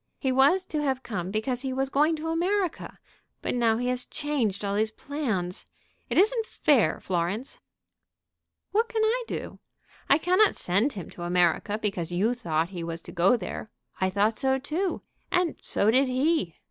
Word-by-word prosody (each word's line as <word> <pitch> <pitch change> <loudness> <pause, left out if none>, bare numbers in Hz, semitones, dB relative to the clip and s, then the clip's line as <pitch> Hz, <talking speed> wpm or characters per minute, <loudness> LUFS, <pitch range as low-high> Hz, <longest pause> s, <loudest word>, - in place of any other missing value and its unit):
"He 265 - 0
was 285 +9 +4
to 305 -4 -2
have 265 -3 -1
come 185 -5 -4
because 230 +5 -1
he 265 -1 -3
was 265 +1 -1
going 300 +4 +3
to 315 +1 -4
America. 360 +2 -1 0.5
But - - -1
now 230 -2 +2
he 245 +1 -2
has 250 0 0
changed 250 -10 -2
all 200 - -1
his 215 +2 +1
plans. 220 -8 -3 0.4
It - - -1
isn't 450 +3 +3
fair, 245 - +2
Florence." 185 +7 -2 1.1
"What 450 +3 +2
can 440 -1 0
I 485 +3 +1
do? - - -5 0.5
I 280 - +6
cannot 365 +6 +3
send 205 +11 +1
him 190 -4 -7
to - - -11
America 175 +4 +1
because 195 -6 -2
you 200 +7 +1
thought 165 -9 -1
he 180 -3 -6
was 165 0 -5
to - - -8
go 185 +8 +3
there. 215 +1 -6 0.3
I 190 - +2
thought 205 +3 +2
so 265 0 +2
too; 320 +7 -2 0.3
and 360 -2 +1
so 210 +2 +2
did 265 +3 +4
he. 255 - +1
250 Hz, 175 wpm, -27 LUFS, 195-305 Hz, 1.1 s, I